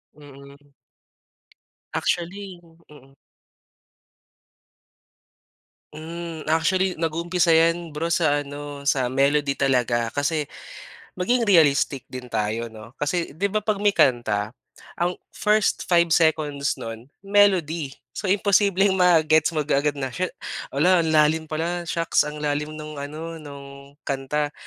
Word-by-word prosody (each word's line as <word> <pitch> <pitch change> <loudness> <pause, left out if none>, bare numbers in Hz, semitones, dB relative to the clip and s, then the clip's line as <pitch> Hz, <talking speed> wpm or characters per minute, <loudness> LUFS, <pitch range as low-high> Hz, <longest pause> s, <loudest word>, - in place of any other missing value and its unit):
Mm. 140 0 -15 1.2
Actually 185 +1 -3 0.3
mm. 135 -2 -17 2.8
Mm, 165 0 -7
actually 180 +4 +1
nag-uumpisa 170 +2 0
'yan 165 +1 +3
bro, 150 +3 -3
sa 160 -3 +2
ano 145 0 -8
sa 130 -3 +1
melody 140 +1 +1
talaga 125 -3 +1
kasi 145 +1 0 0.7
maging 230 +5 +1
realistic 145 -6 +3
din 125 -1 -7
tayo 110 +1 -2
'no, 110 +1 -13
kasi 165 +3 -1
'di 195 +7 -1
ba 210 +1 -2
'pag 210 -2 0
may 210 - +3
kanta, 110 -4 +2 0.5
ang 175 +1 0 0.2
first 210 0 +1
5 170 -2 +3
seconds 150 -3 +1
no'n 115 +2 -8 0.2
melody. 175 -8 +2 0.2
So, 200 - -4
imposibleng 200 0 +3
ma-gets 160 -3 +4
mo 150 - +1
kaagad 145 0 +1
na 135 -3 -4
siya 185 +7 -2 0.4
"'Ala 175 +6 +3
ang 165 - 0
lalim 155 0 +3
pala, 170 +2 -3
shocks 165 -1 +1
ang 150 - -7
lalim 150 +1 -2
nung 155 -1 -7
ano 160 +3 -7
nung 140 -1 -12
kanta," 145 +2 -2
155 Hz, 120 wpm, -23 LUFS, 140-170 Hz, 2.8 s, ma-gets